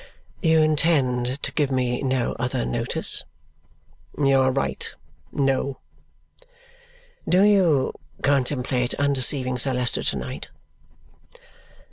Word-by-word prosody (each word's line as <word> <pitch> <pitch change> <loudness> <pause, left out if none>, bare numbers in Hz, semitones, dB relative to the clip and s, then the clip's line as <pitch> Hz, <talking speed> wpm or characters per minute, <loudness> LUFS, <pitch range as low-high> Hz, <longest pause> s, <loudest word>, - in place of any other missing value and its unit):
"You 160 -2 +4
intend 140 -5 +1
to - - -2
give 145 -3 0
me 125 -2 0
no 130 -3 0
other 125 - -1
notice?" 60 - -2 0.9
"You 135 -2 +3
are 130 0 +3
right. 135 +1 -2 0.4
No." 135 0 0 1.5
"Do 185 +2 +5
you 185 -10 +3 0.3
contemplate 130 -2 0
undeceiving 130 -2 +1
Sir 135 +2 +2
Leicester 125 -2 0
to - - -1
night?" 65 -2 -6
135 Hz, 100 wpm, -23 LUFS, 125-145 Hz, 1.5 s, Do